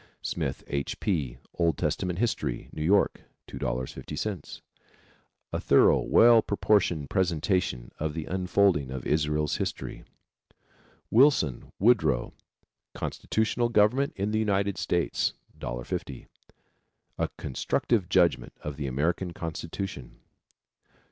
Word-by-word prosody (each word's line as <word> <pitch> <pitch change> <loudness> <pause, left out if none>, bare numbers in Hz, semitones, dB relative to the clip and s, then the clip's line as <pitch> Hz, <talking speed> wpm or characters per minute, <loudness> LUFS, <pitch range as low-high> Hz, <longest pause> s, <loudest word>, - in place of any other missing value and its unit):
Smith, - - -3
H. 70 -1 -3
P., 70 - -1 0.2
Old 85 -4 +1
Testament 90 -2 -1
History. 110 - -2
New 75 - -6
York, 95 +6 +2 0.3
$2.50. 70 - -4 0.9
A - - 0
thorough, - - +5
well 115 -1 +6
proportioned 100 -8 +1
presentation 90 -7 0
of 75 0 -2
the 80 -2 -3
unfolding 90 -5 +2
of 65 -1 -6
Israel's 75 0 +1
history. - - -4 1.1
Wilson, 115 - +3
Woodrow, 95 - +3 0.6
Constitutional 115 +2 -1
Government 120 +5 +3
in 100 +2 -1
the 110 - +1
United 100 -2 0
States. 85 -1 0 0.2
$1.50. - - -5 0.9
A - - 0
constructive 95 - -1
judgment 90 -3 +2
of 75 -2 -5
the 70 -2 -3
American 85 +7 -1
constitution. 85 -3 -6
90 Hz, 100 wpm, -28 LUFS, 75-100 Hz, 1.1 s, well